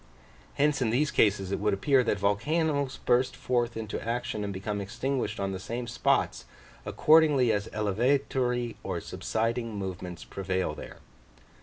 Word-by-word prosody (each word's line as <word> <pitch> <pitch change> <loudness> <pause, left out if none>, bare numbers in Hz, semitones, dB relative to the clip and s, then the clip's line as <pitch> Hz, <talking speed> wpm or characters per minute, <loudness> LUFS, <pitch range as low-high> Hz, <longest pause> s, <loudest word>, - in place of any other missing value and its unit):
Hence 145 0 +2
in 120 - +2
these 145 +7 +1
cases 100 -3 +2
it - - -1
would 105 -1 +1
appear, 135 +5 +3
that 105 - 0
volcanos 140 - 0
burst 125 +1 +3
forth 120 -2 -1
into 110 -1 -4
action 115 -2 -2
and 100 - -3
become 100 +2 -3
extinguished 120 +1 -2
on 95 0 -1
the 95 - -4
same 120 +5 -4
spots, 115 0 0 0.4
accordingly 150 -6 +5
as 105 -1 -1
elevatory 120 +3 0
or - - -3
subsiding 115 0 -2
movements 90 -3 -5
prevail 95 -1 -2
there. - - -10
115 Hz, 145 wpm, -28 LUFS, 100-130 Hz, 0.4 s, accordingly